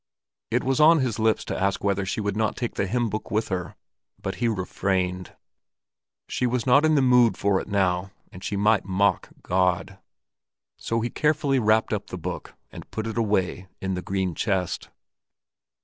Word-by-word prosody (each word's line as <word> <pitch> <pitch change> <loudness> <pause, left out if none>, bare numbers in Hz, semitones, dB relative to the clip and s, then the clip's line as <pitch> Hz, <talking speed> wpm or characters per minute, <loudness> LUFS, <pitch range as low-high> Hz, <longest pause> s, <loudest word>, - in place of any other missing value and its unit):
It - - +1
was 135 0 0
on 160 +2 +7
his 120 -4 -1
lips 110 0 +2
to - - -3
ask 100 0 0
whether 100 -1 0
she 95 - -2
would 100 -1 -2
not 110 0 0
take 120 -2 -3
the 100 - -1
hymn 120 +3 0
book 110 0 -4
with 110 +1 -1
her, 90 -2 -3 0.4
but - - -3
he 120 - +3
refrained. 95 -3 -2 0.9
She 125 - -1
was 120 -1 -1
not 135 +3 +5
in 155 0 +4
the 140 - +4
mood 125 -5 +5
for 100 -1 +1
it - - -9
now, 95 -2 +1 0.2
and 90 - -11
she 100 - -2
might 105 0 +3
mock 100 +1 +1
God; 95 +1 0 0.8
so 115 0 -2
he 120 - -2
carefully 150 -3 +1
wrapped 110 0 +2
up 105 - -3
the 90 - -6
book 85 - -6 0.2
and - - -11
put 110 - -4
it 115 - -4
away 95 -5 0
in 95 0 -2
the 90 - -3
green 95 -1 -2
chest. 90 -2 -2
100 Hz, 185 wpm, -25 LUFS, 95-115 Hz, 0.9 s, on